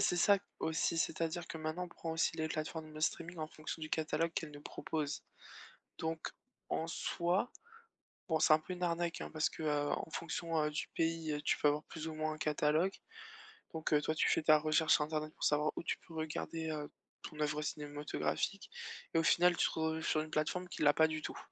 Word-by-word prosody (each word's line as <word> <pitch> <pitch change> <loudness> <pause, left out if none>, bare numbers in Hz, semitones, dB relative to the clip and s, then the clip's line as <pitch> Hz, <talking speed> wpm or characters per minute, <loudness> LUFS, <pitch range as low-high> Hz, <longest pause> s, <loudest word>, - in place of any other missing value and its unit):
c'est 190 -3 +3
ça, 200 +3 +6 0.2
aussi. 160 +1 +1
C'est-à-dire 165 +1 -1
que - - -5
maintenant, 160 +3 -2
on - - -9
prend 165 -1 -5
aussi 160 0 +1
les 160 - 0
plateformes 155 0 -4
de 155 - -7
streaming 170 +2 -1
en 155 - -2
fonction 155 +1 -6
du 155 - -4
catalogue 160 +1 +1
qu'elles 160 - -2
nous 145 0 -10
proposent. 150 0 -3 0.8
Donc 160 0 -2 0.4
en 160 - 0
soi, 175 +6 0 0.8
bon, 160 -2 +2
c'est 155 - +7
un 155 - +6
peu 170 +4 -6
une 180 0 -4
arnaque, 170 0 0
hein, - - -4
parce 155 0 +2
que, - - -7
heu, 145 -1 +1
en - - -2
fonction, 165 -1 -1
heu, 150 - +1
du 150 - -3
pays, 165 -1 +1
heu, 150 0 -1
tu - - +2
peux - - +4
avoir 150 +1 0
plus 160 0 -6
ou - - -5
moins 155 0 -1
un 155 - -8
catalogue. 155 +4 +2 0.8
Donc 160 -1 -2
heu, 150 - +5
toi, 155 +1 0
tu - - +3
fais - - +3
ta 155 0 +7
recherche 155 +1 +4
sur 150 - +5
internet 155 0 -2
pour - - -8
savoir 150 +1 +3
où - - -4
tu - - -1
peux 165 - -12
regarder, 160 +1 -3
heu, 150 -1 -3 0.3
ton 155 - -8
œuvre 150 0 +1
cinématographique 150 +6 -2 0.4
et - - +3
au - - +2
final, 175 +1 +5
tu - - +4
te - - -3
retrouves 160 0 0
sur 155 - +3
une 155 - -6
plateforme 175 +4 -1
qu'il 155 - -1
l'a 145 - +7
pas 160 +1 +5
du 155 0 -3
tout - - -5
160 Hz, 225 wpm, -35 LUFS, 155-165 Hz, 0.8 s, c'est